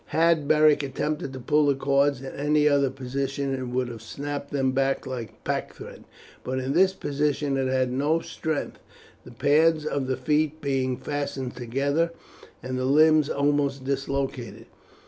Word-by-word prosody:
Had 165 Hz, -2 st, +2 dB
Beric 150 Hz, -1 st, +5 dB
attempted 145 Hz, 0 st, -3 dB
to 130 Hz, -, -7 dB
pull 150 Hz, +4 st, +2 dB
the 140 Hz, -, +3 dB
cords 140 Hz, 0 st, +1 dB
in 135 Hz, -, -7 dB
any 150 Hz, +1 st, +2 dB
other 140 Hz, -2 st, +3 dB
position 135 Hz, +1 st, -3 dB
it 130 Hz, -1 st, -3 dB
would 125 Hz, 0 st, -1 dB
have 115 Hz, -3 st, -8 dB
snapped 140 Hz, +5 st, -5 dB
them 135 Hz, -2 st, 0 dB, 0.3 s
like 125 Hz, -4 st, -7 dB
pack -, -, -3 dB
thread, -, -, -11 dB, 0.4 s
but 130 Hz, +1 st, -3 dB
in 130 Hz, +1 st, -2 dB
this 190 Hz, +4 st, +5 dB
position 145 Hz, -3 st, -1 dB
it 135 Hz, -1 st, 0 dB
had 130 Hz, -1 st, +1 dB
no 145 Hz, +5 st, +1 dB
strength, 160 Hz, -2 st, -4 dB, 0.5 s
the -, -, -11 dB
pads 150 Hz, +5 st, +3 dB
of 140 Hz, -3 st, -1 dB
the 130 Hz, -1 st, -1 dB
feet 150 Hz, +3 st, 0 dB
being 135 Hz, -3 st, -1 dB
fastened 140 Hz, -3 st, -4 dB
together 140 Hz, +7 st, 0 dB, 0.5 s
and 130 Hz, 0 st, -3 dB
the 130 Hz, -, -1 dB
limbs 155 Hz, +2 st, +5 dB
almost 140 Hz, -1 st, 0 dB
dislocated. 135 Hz, -2 st, -3 dB
140 Hz, 160 wpm, -25 LUFS, 130-150 Hz, 0.5 s, Beric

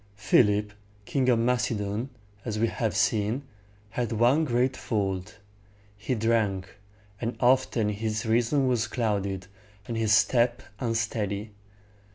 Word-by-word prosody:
Philip, 105 Hz, 0 st, +3 dB, 0.3 s
King 130 Hz, +1 st, +1 dB
of 120 Hz, -, +4 dB
Macedon, 115 Hz, -1 st, 0 dB, 0.3 s
as 110 Hz, -2 st, -3 dB
we 110 Hz, -, +2 dB
have 110 Hz, -3 st, -2 dB
seen, 105 Hz, +4 st, +1 dB, 0.5 s
had 120 Hz, -1 st, -2 dB
one 120 Hz, +8 st, +3 dB
great 125 Hz, 0 st, +1 dB
fault. 100 Hz, -3 st, -3 dB, 0.6 s
He 125 Hz, +5 st, -2 dB
drank; 110 Hz, -4 st, 0 dB, 0.5 s
and 115 Hz, +1 st, -3 dB
often 120 Hz, -3 st, +3 dB
his 110 Hz, +1 st, -2 dB
reason 120 Hz, +5 st, +2 dB
was 120 Hz, -2 st, +1 dB
clouded, 100 Hz, -5 st, -1 dB, 0.4 s
and 115 Hz, -, -3 dB
his 110 Hz, -1 st, +1 dB
step 120 Hz, +2 st, +3 dB, 0.2 s
unsteady. 110 Hz, -3 st, -2 dB
115 Hz, 120 wpm, -27 LUFS, 105-120 Hz, 0.6 s, of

